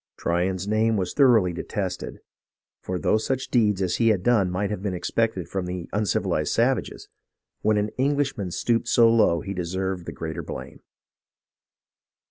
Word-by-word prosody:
Tryon's 90 +3 -1
name 110 +1 +2
was 95 -2 -2
thoroughly 115 -10 +4
detested; 95 +1 -4 0.6
for 90 - -3
though 110 - +2
such 130 +4 -2
deeds 105 -5 +2
as 90 -1 0
he 115 - +2
had 105 -5 +2
done 110 -6 +3
might 100 +3 -2
have 105 -3 -4
been 100 -2 -2
expected 95 -1 -1
from 95 -2 -3
the 90 -1 -5
uncivilized 95 -6 0
savages, 120 +1 0 0.5
when 110 0 +2
an 105 +1 0
Englishman 140 -7 0
stooped 115 +6 0
so 120 -1 +5
low 110 -7 +3
he 100 -2 -5
deserved 95 0 -3
the - - -3
greater 80 -1 -5
blame. - - -8
100 Hz, 155 wpm, -24 LUFS, 90-115 Hz, 0.6 s, so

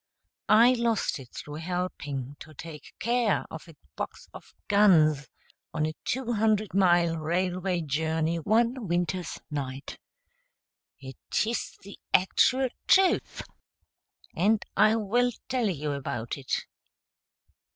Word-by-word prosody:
I 230 +4 +7
lost 235 - 0
it 130 -3 -12
through 150 +3 -8
helping 155 -6 -4
to 155 -1 -12
take 150 0 -10
care 235 -1 +1
of 160 - -9
a 165 - -14 0.2
box - - -6
of - - -13
guns 155 -9 +4 0.5
on 155 - +1
a 155 - -2
two 245 -1 -2
hundred 215 -1 +1
mile 175 -3 +3
railway 180 +2 -1
journey 160 +2 -1
one 230 - +1
winter's 175 0 -2
night. 135 -2 -5 1.0
It 130 - -3
is 230 +1 -3
the 200 +1 -12 0.2
actual 255 +7 +3 0.2
truth, 380 -1 +3 0.9
and 210 +4 +2
I 215 +1 +5
will 230 +3 +1 0.2
tell 250 -4 0
you 150 -4 -3
about 125 -5 -4
it. 135 -2 -3
180 Hz, 120 wpm, -27 LUFS, 155-220 Hz, 1.0 s, I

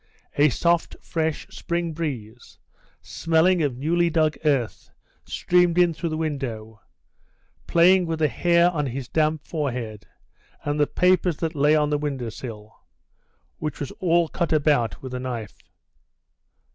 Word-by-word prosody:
A 145 +1 +5
soft, 170 +5 +1
fresh 160 0 -3
spring 170 -3 -3
breeze, 125 -8 -6 0.5
smelling 165 +2 +2
of 140 -5 -1
newly 170 +5 +1
dug 155 -2 +1
earth, 135 -7 0 0.4
streamed 180 -1 +2
in 175 -2 +4
through 165 +2 -3
the 155 - -3
window, 120 -9 -4 0.9
playing 180 +1 +4
with 165 0 -2
the 155 -1 +2
hair 170 +3 +3
on 150 -4 -2
his 130 0 -5
damp 155 +1 0
forehead 125 -9 -4 0.6
and 145 0 -2
the 145 - +3
papers 180 -2 +2
that 165 -1 -2
lay 150 +1 +3
on 150 -1 +1
the 150 - +1
window 135 -5 -3
sill, 110 -2 -9 0.8
which 155 -1 -4
was 140 - -4
all 170 -2 +2
cut 170 +1 -2
about 145 -7 +1
with 130 -1 -7
a 125 - -3
knife. 120 -5 -6
155 Hz, 145 wpm, -24 LUFS, 130-170 Hz, 0.9 s, A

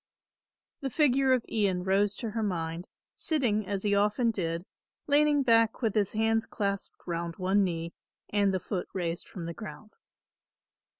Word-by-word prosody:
The 275 - -3
figure 270 -2 +3
of 255 -2 +2
Ian 195 -5 0
rose 195 +2 +2
to 225 0 -4
her 225 +1 -2
mind, 170 -4 -2 0.3
sitting 230 - 0
as 200 -1 -2
he 205 -1 +2
often 210 +4 +2
did, 170 -4 -3 0.4
leaning 290 0 +4
back 230 -1 +3
with 220 -3 +2
his 205 -3 +1
hands 225 +1 +1
clasped 200 -3 -2
round 170 -1 -3
one 190 +2 +2
knee 170 -2 -2 0.3
and 200 -1 +2
the 190 - 0
foot 180 0 -4
raised 175 -2 -3
from 175 -3 -7
the 170 - -4
ground. 215 +1 -9
205 Hz, 160 wpm, -29 LUFS, 185-230 Hz, 0.4 s, leaning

